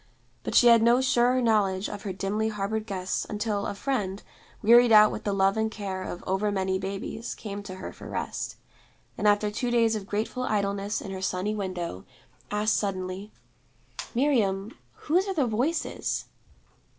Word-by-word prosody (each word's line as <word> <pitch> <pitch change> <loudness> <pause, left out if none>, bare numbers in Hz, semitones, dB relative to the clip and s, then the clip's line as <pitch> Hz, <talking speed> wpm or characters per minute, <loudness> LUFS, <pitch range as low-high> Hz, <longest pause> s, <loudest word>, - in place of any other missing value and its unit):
But - - -4
she - - +7
had 235 -1 +7
no 235 +2 +5
surer 250 0 +3
knowledge 205 -4 +2
of 205 - -6
her 200 - -4
dimly 195 +4 -1
harbored 215 +1 -3
guests 190 -2 -2
until 210 -1 -2
a - - -4
friend, 205 -5 -2 0.4
wearied 240 +2 +7
out 215 -1 +8
with - - -6
the 205 - +1
love 195 +1 +2
and 220 0 +1
care 195 -3 -5
of 175 - -6
over 190 +2 0
many 190 -1 0
babies, 195 +4 -5
came 205 -2 -6
to 190 -2 -8
her 185 - -7
for - - -10
rest; - - -4 0.6
and 210 - 0
after 205 0 +3
two 240 +4 -2
days 230 -2 +3
of 200 -2 -5
grateful 215 +5 -2
idleness 200 -2 -1
in 195 - -7
her 190 -1 -5
sunny 190 +2 -1
window, 180 - -4 0.5
asked 210 +1 +1
suddenly, 190 0 -3 0.8
'Miriam, 220 -6 +1 0.3
whose 360 +6 +2
are 385 - -2
the 290 -5 +2
Voices?' 255 +9 -1
210 Hz, 170 wpm, -27 LUFS, 195-230 Hz, 0.8 s, out